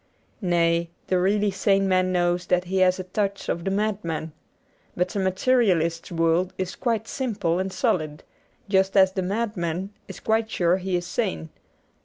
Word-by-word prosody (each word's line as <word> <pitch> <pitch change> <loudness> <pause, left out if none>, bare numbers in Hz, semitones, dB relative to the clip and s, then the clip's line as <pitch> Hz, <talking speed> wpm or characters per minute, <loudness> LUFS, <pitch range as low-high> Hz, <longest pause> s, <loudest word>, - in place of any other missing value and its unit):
Nay, 170 -2 +2 0.2
the 185 - +1
really 205 +2 +2
sane 195 0 +2
man 185 -1 +2
knows 175 0 +1
that 180 0 +2
he 185 +1 -3
has 185 -1 +4
a - - -3
touch 200 +1 -2
of 170 - -1
the 195 - -1
madman. 195 -6 -2 0.7
But 180 +1 +1
the 200 - -3
Materialist's 190 -5 +1
world 165 +2 +1
is 185 -1 -3
quite 225 -3 -1
simple 200 -10 -1
and 190 +1 -2
solid, 155 - -1 0.4
just 195 0 +2
as 190 -1 +6
the 190 - -2
madman 190 -2 -2 0.2
is - - -9
quite 220 0 0
sure 175 -3 +2
he 190 -1 -2
is 175 0 -1
sane. 80 - -2
185 Hz, 165 wpm, -24 LUFS, 175-200 Hz, 0.7 s, as